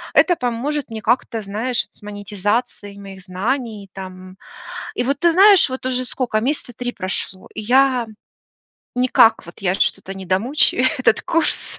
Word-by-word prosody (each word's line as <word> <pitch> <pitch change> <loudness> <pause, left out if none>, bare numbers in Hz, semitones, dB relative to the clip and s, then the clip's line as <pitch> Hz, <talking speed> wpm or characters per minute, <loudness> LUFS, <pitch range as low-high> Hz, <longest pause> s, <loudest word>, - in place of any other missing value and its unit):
это 355 - +5
поможет 250 +4 -2
мне 220 -1 -6
как-то, 230 0 0
знаешь, 220 +5 -2
с - - -24
монетизацией 205 +1 -3
моих 195 -1 -10
знаний 210 +2 -3
там. 185 0 -10 0.6
И - - 0
вот 275 +3 -1
ты 340 -1 +4
знаешь, 390 -2 +6
вот 260 0 -6
уже 255 0 0
сколько 240 -4 -1
месяца 265 0 -2
3 245 +1 -3
прошло, 185 0 -3
и 215 - -5
я 255 +1 +3 0.9
никак 250 -5 +4
вот 170 - -13
я 180 -1 +1
что-то 195 0 -1
не 190 -1 -8
домучаю 240 - +2
этот 250 -3 +3
курс. 330 -1 -1
230 Hz, 155 wpm, -20 LUFS, 195-255 Hz, 0.9 s, знаешь